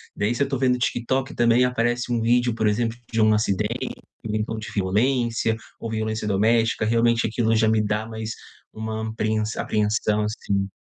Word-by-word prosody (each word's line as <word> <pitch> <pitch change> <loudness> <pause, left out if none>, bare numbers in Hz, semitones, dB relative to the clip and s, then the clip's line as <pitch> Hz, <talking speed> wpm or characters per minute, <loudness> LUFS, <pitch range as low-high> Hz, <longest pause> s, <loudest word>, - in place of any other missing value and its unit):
Daí, 105 +4 0
se 120 - +1
eu 140 - -3
tô 135 - -1
vendo 125 -1 +2
TikTok, 130 +2 -1
também 120 +1 +4
aparece 120 0 0
um 120 - +1
vídeo, 120 +1 +2
por 110 -1 +1
exemplo, 115 +2 0
de 115 -1 +1
um 110 0 +5
acidente 105 -3 -1 0.3
ou 105 - -2
então 110 +1 -2
de 110 - -6
violência 115 +3 +1 0.2
ou 115 - -5
violência 110 -1 -2
doméstica. 110 +2 +2
Realmente 115 +1 +2
aquilo 115 0 +1
já 110 0 +3
me 110 -1 +3
dá 105 +1 -1
mais 110 -1 -5 0.4
uma 110 0 -4
apreens 110 0 -1
apreensão, 105 0 0
assim. 100 -2 -1
110 Hz, 175 wpm, -23 LUFS, 110-120 Hz, 0.4 s, um